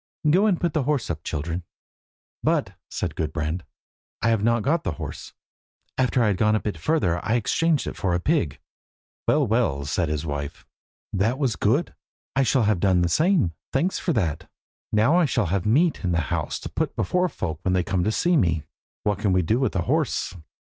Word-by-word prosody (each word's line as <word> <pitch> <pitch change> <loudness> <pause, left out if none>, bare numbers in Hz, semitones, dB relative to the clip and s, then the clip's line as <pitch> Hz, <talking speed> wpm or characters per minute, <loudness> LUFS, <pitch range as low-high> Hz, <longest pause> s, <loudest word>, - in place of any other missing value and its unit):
Go 185 +8 +5
and 190 -5 +2
put 175 - 0
the 155 - +1
horse 140 -11 0
up, 80 -1 -5
children." 80 +3 -3 0.8
"But," - - +1 0.2
said - - -3
Gudbrand, 80 +2 -2 0.6
"I 115 - +4
have 115 -3 +2
not 115 -1 +2
got 160 +4 +1
the - - -2
horse. - - -7 0.6
After 125 -1 +2
I - - +3
had 100 - 0
gone 105 +2 +3
a - - +2
bit 105 -3 -3
further 90 - 0
I 110 +1 +1
exchanged 155 +6 +1
it - - -5
for 90 -3 0
a - - +1
pig." 90 - 0 0.7
"Well, - - +3
well," 100 - +1
said 75 +3 0
his 75 +1 -2
wife, 75 -1 -5 0.5
"that 105 +6 +1
was 130 -7 0
good. - - +1 0.4
I 135 - +3
should 130 -3 +3
have 105 -4 +2
done 95 -1 +3
the 85 - +2
same. 155 - +2 0.2
Thanks 170 +8 +1
for 175 - -1
that! 85 - -1 0.4
now 110 +11 +4
I 175 - +4
shall 120 -6 +1
have 100 0 0
meat 155 +8 +3
in 90 -2 0
the 85 - +2
house - - -2
to - - -6
put - - -2
before 180 0 +1
folk 80 - -4
when 95 - 0
they 90 -1 +2
come 90 +1 0
to 110 - +1
see 175 +9 +2
me. 85 - +2 0.4
What 105 -2 0
could 100 -3 +1
we 90 0 +3
do 110 +9 +1
with 130 - 0
a 90 - +1
horse? - - 0
105 Hz, 205 wpm, -24 LUFS, 85-135 Hz, 0.8 s, Go